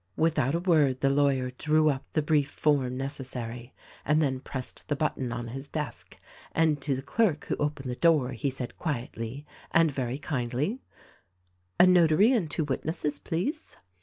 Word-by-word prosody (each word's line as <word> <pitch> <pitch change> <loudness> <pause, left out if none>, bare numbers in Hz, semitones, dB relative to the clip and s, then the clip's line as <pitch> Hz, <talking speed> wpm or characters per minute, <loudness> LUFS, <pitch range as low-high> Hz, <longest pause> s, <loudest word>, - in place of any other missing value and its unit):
" - - -41
Without 150 -3 +1
a - - +1
word 155 -8 +3
the 135 - +3
lawyer 135 -2 +2
drew 155 0 +3
up 135 -2 -3
the 155 - +1
brief 145 -2 +2
form 135 -4 +1
neces 135 0 -4
sary 120 0 -6 0.3
and 150 +1 +2
then 135 -4 +1
pressed 130 -1 -7
the 145 - 0
button 140 -4 -1
on 120 -1 -4
his 135 +4 -6
desk, 150 -7 -6 0.4
and 155 -3 +2
to 140 -1 0
the 130 - -5
clerk 175 +1 +1
who - - -1
opened 145 -2 -2
the - - -3
door 150 -4 +3
he 135 +3 -2
said 130 -2 -7
quietly 130 -2 -4 0.2
and 165 -2 +4
very 130 -2 -2
kindly: 140 - -2 1.0
"A 180 - +9
Notary 180 +4 +5
and 210 -11 +1
two 160 - 0
witnesses, 150 +1 -2
please." 245 - -3
145 Hz, 175 wpm, -28 LUFS, 130-155 Hz, 1.0 s, A